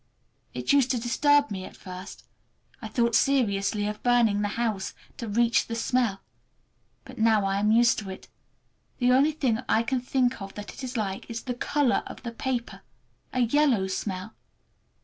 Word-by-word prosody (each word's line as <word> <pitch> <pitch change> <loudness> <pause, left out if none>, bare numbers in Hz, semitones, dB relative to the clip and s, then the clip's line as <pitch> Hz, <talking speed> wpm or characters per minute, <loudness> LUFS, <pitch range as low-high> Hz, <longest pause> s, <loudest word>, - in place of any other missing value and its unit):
It - - 0
used 275 -3 +4
to 250 -2 +1
disturb 290 +4 +3
me 190 -2 -4
at - - -11
first. 185 +1 -9 0.6
I 220 - -5
thought 235 +1 +1
seriously 210 -6 +2
of 210 0 -4
burning 235 -4 +3
the 205 - +1
house—to 220 +1 -4
reach 230 +2 +2
the 230 - -4
smell. 230 -4 0 0.8
But - - -11
now 220 -2 +3
I 195 0 0
am 210 +1 +2
used 235 +1 +4
to 205 -3 -7
it. 190 - -9 0.7
The 250 0 +3
only 275 +4 +4
thing 260 -7 0
I 225 - +3
can 250 +2 -1
think 250 -2 0
of 195 0 -8
that 205 0 -7
it - - -10
is 255 -1 -4
like 195 -3 -3
is 230 0 -5
the 250 - -3
color 260 +1 +1
of - - -10
the 235 - -4
paper! 245 0 -4 0.5
A 255 - 0
yellow 245 -4 +3
smell. 190 +1 -4
230 Hz, 175 wpm, -26 LUFS, 205-250 Hz, 0.8 s, used